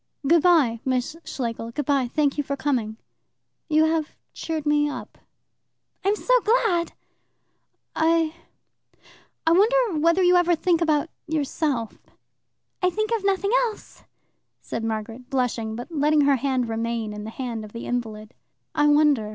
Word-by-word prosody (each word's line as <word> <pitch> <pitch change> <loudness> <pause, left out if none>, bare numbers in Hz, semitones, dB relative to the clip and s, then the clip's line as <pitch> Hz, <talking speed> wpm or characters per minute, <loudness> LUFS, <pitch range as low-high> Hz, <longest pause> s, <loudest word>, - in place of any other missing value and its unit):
"Good 335 +2 +5
bye, 290 -10 +4
Miss 255 +3 -1
Schlegel, 230 -3 -4
good 290 +4 -4
bye. 275 -3 +1
Thank 290 -1 +1
you 290 - -1
for 280 0 -3
coming. 245 -6 -1 0.7
You 310 0 +4
have 315 -1 -1 0.2
cheered 320 -2 -4
me 295 0 +2
up." - - -8 0.8
"I'm 400 +2 +2
so - - 0
glad!" 425 -7 +1 1.0
"I 320 0 +2 1.1
I 325 - +4
wonder 430 0 +3
whether 335 +4 +3
you 360 0 +5
ever 355 -1 +3
think 340 +1 +1
about 315 -1 +1 0.2
yourself.?" 290 -6 -2 0.8
"I 365 - +3
think 430 +4 -2
of 435 - -4
nothing 395 +1 +1 0.2
else," 425 - -14 0.6
said 230 - -5
Margaret, 225 +3 -5
blushing, 245 -4 -1
but 245 +8 -8
letting 300 0 +2
her 280 -1 +4
hand 255 -1 -1
remain 225 -1 -3
in 210 0 -7
that 230 0 -5
of 210 - -10
the 230 - -7
invalid. 220 -3 -4 0.4
"I 295 - +3
wonder. 290 -7 +3
295 Hz, 145 wpm, -24 LUFS, 235-335 Hz, 1.1 s, Good